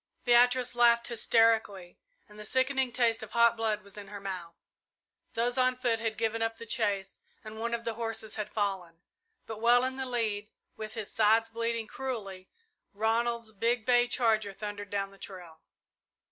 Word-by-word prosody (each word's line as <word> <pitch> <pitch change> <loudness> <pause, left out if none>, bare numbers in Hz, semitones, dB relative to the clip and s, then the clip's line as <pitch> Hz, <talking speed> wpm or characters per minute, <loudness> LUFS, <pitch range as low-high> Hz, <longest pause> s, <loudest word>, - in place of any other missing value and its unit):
Beatrice 245 +1 +4
laughed 235 0 +4
hysterically 220 -5 +2 0.3
and 210 -1 -15
the - - -7
sickening 260 +2 +1
taste 230 -2 +1
of 220 0 -9
hot 235 0 +5
blood 220 -2 -1
was 200 +1 -12
in 200 - -10
her 205 0 -8
mouth. 185 -4 -6 0.8
Those 240 +2 +1
on 255 0 +3
foot 240 -3 0
had 225 -1 -2
given 225 0 -1
up 225 0 -1
the 230 - -9
chase 205 -4 -1 0.2
and 220 0 -9
one 235 +1 -1
of 235 - -7
the 230 - -2
horses 225 -1 -3
had 215 -2 -4
fallen, 190 -5 -3 0.4
but 220 -1 -7
well 240 +1 +5
in 260 0 -2
the 265 -1 -3
lead, 215 -4 -1 0.3
with 215 0 -7
his 220 -3 -5
sides 225 +1 +3
bleeding 230 0 -2
cruelly, 210 -8 -6 0.5
Ronald's 230 +1 0
big 230 +2 0
bay 245 -1 +4
charger 220 -5 +1
thundered 205 0 -6
down 195 0 -2
the 195 - -18
trail. 175 -4 -10
225 Hz, 175 wpm, -30 LUFS, 205-235 Hz, 0.8 s, hot